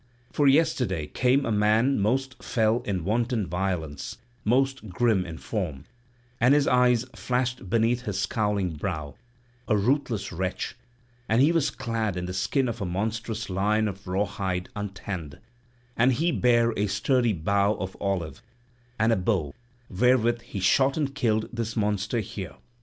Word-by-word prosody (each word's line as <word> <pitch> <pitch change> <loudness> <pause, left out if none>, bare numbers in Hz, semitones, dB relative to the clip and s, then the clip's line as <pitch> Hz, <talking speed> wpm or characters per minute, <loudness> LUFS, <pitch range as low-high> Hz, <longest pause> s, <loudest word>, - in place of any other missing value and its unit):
For 145 - +2
yesterday 135 - +2
came 125 - +2
a 115 - -1
man 110 +5 +3
most 130 +5 0
fell 110 +1 +1
in 95 -4 -2
wanton 115 +1 0
violence, 90 -4 -3 0.3
most 130 0 +1
grim 95 -1 +1
in 80 -1 -7
form; 85 - -4 0.6
and 125 +4 +5
his 145 -1 +3
eyes 125 -1 +4
flashed 125 -5 -2
beneath 115 +3 +2
his 105 -6 -3
scowling 100 -3 0
brow; 75 -3 -4 0.5
a 105 - +3
ruthless 120 0 0
wretch; 90 +5 -3 0.5
and 110 +2 +3
he 145 +5 +5
was 165 -4 +2
clad 115 -6 -2
in 90 - -3
the 90 - -5
skin 130 +8 0
of 115 -1 -4
a - - 0
monstrous 110 +4 -3
lion 105 +3 +1
of 100 -1 -7
raw 95 +3 +1
hide, 95 -2 -3
untanned; 95 -7 -5 0.6
and 125 +3 +4
he 165 +8 +1
bare 120 -4 +3
a 105 +1 0
sturdy 120 +4 +1
bow 100 +4 +1
of 95 0 -5
olive, 95 -5 -2 0.6
and 110 +1 +3
a - - +3
bow, 90 -7 0 0.3
wherewith 120 +3 +2
he 100 - -7
shot 135 - +3
and 140 -3 -1
killed 110 -6 +1
this 115 -1 -3
monster 105 +1 0
here. 100 - -7
110 Hz, 155 wpm, -26 LUFS, 95-125 Hz, 0.6 s, and